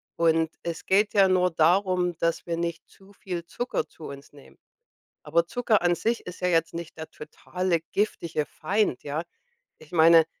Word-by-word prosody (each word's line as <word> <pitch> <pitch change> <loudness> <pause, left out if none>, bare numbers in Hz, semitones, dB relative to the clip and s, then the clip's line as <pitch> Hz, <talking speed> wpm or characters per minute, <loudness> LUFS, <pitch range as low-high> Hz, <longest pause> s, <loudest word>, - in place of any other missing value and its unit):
Und 165 -1 +2
es 170 -1 -5
geht 205 +2 +3
ja 195 -2 +6
nur 180 -1 +3
darum, 180 +1 +2
dass 165 0 0
wir 170 - -2
nicht 170 -1 -3
zu 195 +1 -20
viel 180 -4 -6
Zucker 245 +7 -3
zu 160 - -13
uns 140 +1 -10
nehmen. 140 -2 -17 0.7
Aber 170 0 +2
Zucker 230 -2 +1
an 175 0 +3
sich 230 +5 -1
ist 180 - -8
ja 180 - +1
jetzt 165 -1 +1
nicht 170 -1 -7
der 160 0 -7
totale 170 +2 -3
giftige 170 -7 -1
Feind, 195 -3 -1
ja? 150 +3 -3 0.6
Ich 155 - -17
meine, 165 -1 +6
170 Hz, 175 wpm, -26 LUFS, 160-190 Hz, 0.7 s, ja